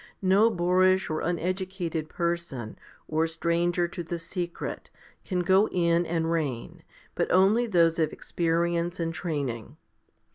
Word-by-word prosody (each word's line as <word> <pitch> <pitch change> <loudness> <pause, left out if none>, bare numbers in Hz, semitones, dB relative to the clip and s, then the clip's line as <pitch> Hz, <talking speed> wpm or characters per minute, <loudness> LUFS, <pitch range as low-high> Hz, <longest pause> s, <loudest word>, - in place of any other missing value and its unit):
No 195 +4 +5
boorish 185 -1 +2
or 155 - -1
uneducated 175 -2 -2
person, 170 -10 -3 0.3
or 160 +1 +1
stranger 170 +1 0
to 175 - -6
the 170 +1 -4
secret, 170 +1 -5 0.3
can 180 -2 -1
go 190 +4 +4
in 170 -1 +1
and 165 0 -1
reign, 145 -8 -3 0.3
but - - -1
only 200 +7 +4
those 170 -5 +3
of 160 - +1
experience 170 +1 -1
and 165 -1 -1
training. 145 -7 -4
170 Hz, 130 wpm, -27 LUFS, 165-180 Hz, 0.3 s, No